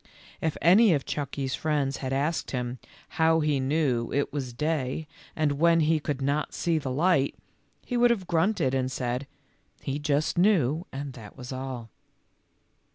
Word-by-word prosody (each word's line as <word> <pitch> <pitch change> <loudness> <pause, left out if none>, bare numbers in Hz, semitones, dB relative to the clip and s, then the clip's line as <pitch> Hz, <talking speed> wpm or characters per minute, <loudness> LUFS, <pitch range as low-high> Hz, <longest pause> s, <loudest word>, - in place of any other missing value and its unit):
If 160 -2 -1
any 190 +2 +6
of 140 - -3
Chucky's 140 -2 -3
friends 145 -2 0
had 130 -1 -4
asked 145 +5 -1
him 125 -1 -3 0.2
" - - -25
how 160 0 +5
he 150 -2 +1
knew 130 -4 0
it 140 0 -1
was 135 -4 -3
day 150 +2 -2 0.3
when 160 +2 +3
he 155 +1 +3
could 145 -2 -3
not 145 +2 -1
see 170 -2 +1
the 140 - -4
light," 140 +1 +2 0.5
he 245 - -2
would 240 0 +5
have 215 -6 0
grunted 170 -5 +1
and 130 -1 0
said, 125 +1 -2 0.3
" - - -39
he 140 +2 -2
just 150 +2 0
knew 175 - +3
and 135 0 -5
that 110 -2 -12
was 125 -1 -8
all." 130 -4 -6
145 Hz, 165 wpm, -27 LUFS, 130-160 Hz, 0.5 s, any